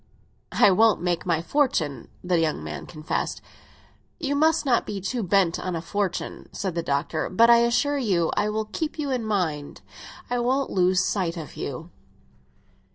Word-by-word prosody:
"It 195 -2 +6
won't 220 +1 +4
make 175 -1 -1
my 165 -2 +1
fortune!" 165 - 0 0.2
the 180 -1 +1
young 155 - 0
man 75 -2 -6
confessed. 155 0 -3 0.8
"You 285 -4 -1
must 315 +2 +3
not 250 -3 +3
be 205 -2 -5
too 230 +6 -2
much 185 - -5
bent 185 -3 +3
on 180 -2 -3
a - - -2
fortune," 195 +1 -3
said 190 -3 -3
the 170 - -1
Doctor. 155 +1 -1
"But 230 +5 +5
I 235 - +8
assure 245 +5 +2
you 185 -9 +1
I 205 +1 +1
will 215 +1 -2
keep 300 +10 -4
you 290 -3 -2
in 250 -3 -1
mind; 175 -9 -2 0.5
I 245 0 -1
won't 260 +3 0
lose 185 -1 +3
sight 180 -4 -1
of 160 -3 -8
you!" 155 +6 -6
195 Hz, 175 wpm, -25 LUFS, 165-240 Hz, 0.8 s, I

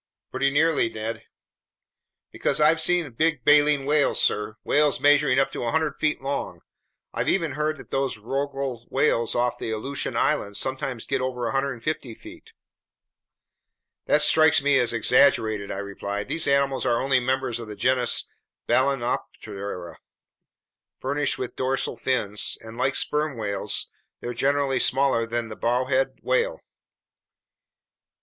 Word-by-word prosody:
"Pretty 140 - +1
nearly, 145 -3 +2
Ned." 110 +1 -6 1.1
"Because - - -1
I've 155 +2 +4
seen 175 -5 +1
big 150 0 0
baleen 145 -1 +5
whales, 145 0 +2
sir, 105 +1 0
whales 145 -1 +2
measuring 145 -2 +4
up 135 - +2
to - - -6
100 150 +5 -1
feet 150 -3 0
long! 140 +1 -4 0.5
I've - - -1
even 165 -5 +1
heard 150 +2 -2
that - - -14
those 135 -3 -1
rorqual 135 +1 -4
whales 130 -5 +1
off 120 0 0
the - - -4
Aleutian 110 +6 -3
Islands 100 0 0
sometimes 130 -2 -2
get - - -1
over 130 -1 -3
150 135 -1 -2
feet." - - -14 1.6
"That - - +4
strikes 160 0 +5
me 145 -1 +3
as 120 - +2
exaggerated," 110 -3 +2
I - - -4
replied. 100 +1 -5
"Those 165 - -1
animals 140 -1 +1
are 120 - +1
only 135 -1 +2
members 125 -2 -1
of 115 - -8
the 105 - -7
genus 125 +1 +1 0.4
Balaenoptera 120 -8 -2 1.0
furnished 145 +2 -1
with 125 - -5
dorsal 130 -1 -1
fins, 110 -4 0
and 115 0 -11
like 130 +2 0
sperm 150 -3 0
whales, 100 -3 -2 0.3
they're 120 - -5
generally 135 +1 +1
smaller 130 -2 +2
than 115 -1 -3
the 110 - -7
bowhead 130 +3 0
whale." - - 0
130 Hz, 135 wpm, -24 LUFS, 115-145 Hz, 1.6 s, baleen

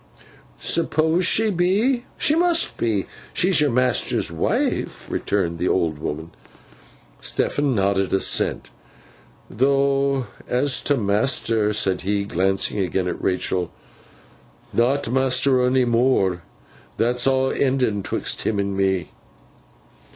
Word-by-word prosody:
'Suppose 165 +1 +1
she 220 -1 +3
be? 205 +8 +1
She 300 - +2
must 340 0 +2
be. 105 -5 -1 0.3
She's 185 -3 +2
your 150 - +3
master's 125 -7 0
wife,' 80 - -2
returned 85 -5 -1
the 90 - 0
old 80 -5 0
woman. 80 +2 -5 0.9
Stephen 145 -3 0
nodded 95 -2 0
assent. 95 - 0 0.8
'Though 135 +2 +1 0.2
as 130 +2 +1
to 145 - +2
master,' 105 0 +1
said 95 -3 0
he, 100 +2 -1
glancing 95 +1 0
again 95 0 -1
at 90 - -4
Rachael, 90 -1 -1 1.0
'not 120 +1 +1
master 130 0 +2
onny 125 0 +2
more. 115 -7 +1 0.6
That's 120 +2 +1
aw 130 0 +2
enden 130 -6 0
'twixt - - -2
him 110 - -1
and 100 0 -2
me. 95 -2 0
120 Hz, 115 wpm, -22 LUFS, 95-140 Hz, 1.0 s, she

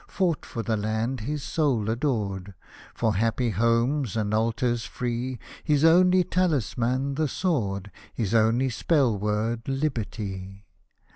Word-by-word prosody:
Fought 175 -5 -1
for 115 - -4
the 110 - 0
land 110 +5 -1
his 145 +6 -3
soul 135 -10 0
adored. 105 -6 -2 0.4
For 110 -2 +1
happy 115 +2 +1
homes 115 +3 +1
and 105 -1 -1
altars 115 +2 +1
free, 125 +1 -3 0.3
His 150 0 +3
only 180 +2 +6
taHsman, 140 - 0
the 155 -1 +2
sword, 100 - -1 0.2
His 110 -2 -2
only 115 +4 +3
spell 135 -2 +2
word, 105 +3 -1
Liberty 105 -8 -3
115 Hz, 125 wpm, -26 LUFS, 110-140 Hz, 0.4 s, only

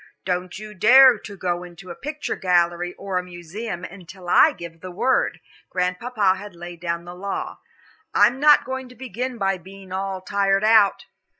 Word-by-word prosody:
"Don't 180 0 -2
you 215 +1 -9
dare 245 +4 +7
to 200 0 -10
go 175 -1 -2
into 180 +1 -11
a - - -7
picture 300 - -4
gallery 175 -1 +1
or 195 -2 -3
a - - -5
museum 175 +2 -7
until 180 0 -11
I - - +6
give 170 -2 -10
the 185 - -7
word," 250 +9 0 0.3
Grandpapa 190 +3 0
had 205 -1 -10
laid 175 0 -9
down 170 0 -3
the 175 - -8
law. 195 +2 -5 0.5
"I'm 255 +3 +4
not 295 +1 +6
going 260 0 -5
to 250 - -15
begin 250 0 -5
by 195 -2 0
being 190 +1 -13
all 190 0 -3
tired 195 +1 +1
out." 215 -2 +4
190 Hz, 175 wpm, -23 LUFS, 175-215 Hz, 0.5 s, dare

